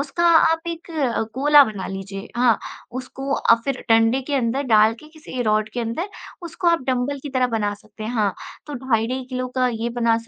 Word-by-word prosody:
उसका 285 +5 -1
आप 325 -1 +5
एक 335 0 -7
अ, 275 -9 0
कोला 290 +2 +7
बना 215 -6 -5
लीजिए, 195 +1 -7
हाँ, 240 -2 +4 0.3
उसको 260 +2 -5
अ, - - +4
फिर 275 -2 -2
डंडे 225 +3 +4
के 290 - -2
अंदर 260 +1 0
डाल 220 -3 +4
के 305 - -14
किसी 305 -5 -8
रॉड 215 -1 +1
के 245 - -3
अंदर, 235 - -3 0.3
उसको 345 +1 -5
आप 335 -1 +3
डंबल 260 +2 0
की 290 - -5
तरह 255 -1 +2
बना 205 -1 -1
सकते 215 +1 -12
हैं, 220 - -3
हाँ, 210 -4 +1 0.3
तो 295 - -6
ढाई-ढाई 255 0 -1
किलो 255 0 -3
का 255 0 +3
ये 225 +1 -2
बना 230 -1 +3
255 Hz, 205 wpm, -22 LUFS, 225-285 Hz, 0.3 s, कोला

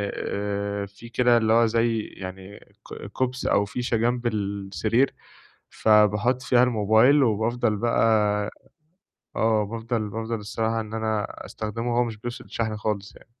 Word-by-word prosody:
آآ 100 0 -3
في 100 +4 -13
كده 120 0 +3
اللي 110 -1 +2
هو 115 0 +5
زي 115 0 +1 0.2
يعني 95 +1 -8 0.2
ك - - -9
كُبْس 130 0 -2
أو 100 - +3
فيشة 120 +2 -2
جنب 120 +1 0
السرير، 100 +3 0 0.6
فباحُط 105 +4 +3
فيها 125 0 +3
الموبايل، 120 +4 +4
وبافضل 115 0 +1
بقى 115 +2 +1 1.3
آه 110 -1 +2
بافضل 115 0 -3
بافضل 115 +2 -3
الصراحة 110 +2 -2
إن 110 0 -9
أنا 110 -2 -1 0.2
أستخدمه 115 +3 -4
وهو 120 - +3
مش 115 -3 -5
بيفصل 120 +2 -7
شحن 110 -2 -2
خالص 105 -1 -3
يعني. - - -18
110 Hz, 140 wpm, -25 LUFS, 105-120 Hz, 1.3 s, هو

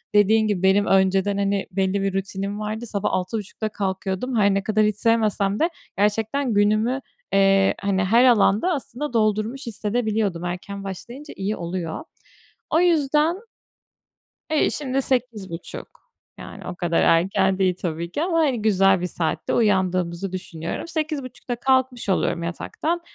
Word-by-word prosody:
dediğin 215 +2 +4
gibi, 195 -3 -1
benim 195 +2 +4
önceden, 195 +1 +2
hani, 200 0 0
belli 195 +1 0
bir 195 -1 -1
rutinim 195 +1 -3
vardı. 215 +2 -4
Sabah 205 -3 -2
06.30'da 205 +3 -3
kalkıyordum. 195 +4 -3
Her 200 -1 +4
ne 195 - 0
kadar 215 +1 +2
hiç 210 -1 +1
sevmesem 215 -3 +1
de, 330 - +3 0.3
gerçekten 220 +5 +1
günümü, 215 +6 +2 0.3
eee, 195 0 +4
hani 195 -2 +1
her 230 +6 +5
alanda, 235 - +4
aslında 285 -1 -5
doldurmuş 220 +4 0
hissedebiliyordum. 215 -4 -1
Erken 190 +3 -5
başlayınca 240 - -8
iyi 195 +2 -2
oluyor. 170 - -4 0.7
O 320 - +4
yüzden 310 -1 +3 1.2
Eee, 310 - +3
şimdi 270 -2 -1
08.30 230 -10 -3 0.5
yani, - - -9
o - - -5
kadar 175 -2 0
erken 190 +3 +3
değil 185 -2 +2
tabii 170 0 -3
ki, 295 - -1
ama, 340 -1 0
hani, 270 -8 +1
güzel 195 -3 +3
bir 180 - -1
saatte 165 -2 -2
uyandığımızı 185 -3 +1
düşünüyorum. 180 - -5
08.30'da 290 -7 -4
kalkmış 260 -2 +1
oluyorum 175 -2 0
yataktan. 315 - -3
205 Hz, 140 wpm, -23 LUFS, 190-240 Hz, 1.2 s, her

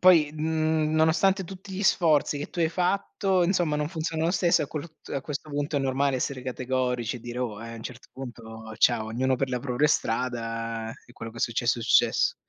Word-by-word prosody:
poi, 165 -5 +6
n 155 0 +1
nonostante 165 +5 +3
tutti 190 +2 -10
gli 190 +2 -3
sforzi 155 -6 +3
che 145 - -4
tu - - -9
hai 165 -2 +3
fatto, 185 +1 +1
insomma, 170 -4 +1
non 150 0 -1
funziona 160 -1 -2
lo 170 - +3
stesso 175 -5 +3
a - - -3
quolut 155 +2 -8
a 140 - -1
questo 150 +2 -5
punto, 145 +1 -1
è - - +4
normale 135 0 +1
essere 130 0 -2
categorici 125 -2 -1
e - - -10
dire: 120 +1 -6
"Oh! 115 -3 -3
e, 115 - -7
a 115 - -7
n' 115 - -9
cert 120 +2 -9
punto 110 -3 -9
ciao, 115 -3 +4
ognuno 130 +3 +1
per 135 +1 -1
la 125 -1 -2
propria 130 +3 +1
strada 115 -2 -1 0.2
e 120 - -16
quello 115 -1 -7
che 115 - -15
è - - -6
successo, 120 +1 +1
è - - -4
successo." 115 - +4
140 Hz, 215 wpm, -27 LUFS, 120-160 Hz, 0.2 s, poi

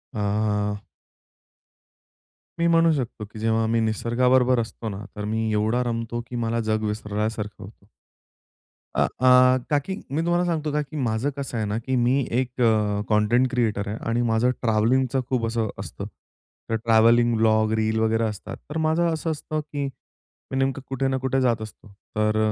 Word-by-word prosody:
आह. 105 0 0 1.8
मी 170 - +3
म्हणू 165 0 +4
शकतो, 120 -6 -3
की 105 +1 -11
जेव्हा 115 0 +1
आम्ही 115 +1 +1
निसर्गाबरोबर 125 +3 +2
असतो 115 -1 -4
ना 100 +1 -6
तर 105 -1 -4
मी 110 +1 -1
एवढा 110 +4 +1
रमतो, 115 0 -3
की 125 - -7
मला 115 0 -1
जग 110 0 +1
विसरल्यासारखं 105 0 -3
होतं. 100 +1 -14 1.1
आ, - - +3
आह, 130 0 +6
का, 145 -1 +3
की 190 +7 -5 0.2
मी 155 - 0
तुम्हाला 175 +1 +1
सांगतो 155 -3 -1
का, 150 +1 +1
की 150 +1 -7
माझं 120 +1 0
कसं 135 -4 -4
आहे 110 - -1
ना, 105 +1 -2
की 130 +3 -2
मी 125 +3 +3
एक 125 +1 0
अ, 105 -3 +2
कंटेंट 115 +4 +3
क्रिएटर 110 -5 0
आहे 110 - -4
आणि 115 +1 +1
माझं 115 +3 +3
ट्रॅव्हलिंगचं 125 +4 +2
खूप 125 -3 0
असं 115 -1 -1
असतं. - - -6 0.6
तर 115 - +1
ट्रॅव्हलिंग 115 +1 +4
ब्लॉग, 110 -1 +3
रील 110 0 +1
वगैरे 110 +1 +1
असतात. 105 -5 -4
तर 150 - -4
माझं 165 +1 +2
असं 160 +1 -2
असतं, 155 0 -3
की 145 -1 -4 0.7
मी 130 - -2
नेमकं 135 +1 0
कुठे 135 0 -1
ना 135 0 0
कुठे 130 0 0
जात 120 -3 +1
असतो. 110 0 -10 0.3
तर 110 0 +1
115 Hz, 170 wpm, -24 LUFS, 110-130 Hz, 1.8 s, आह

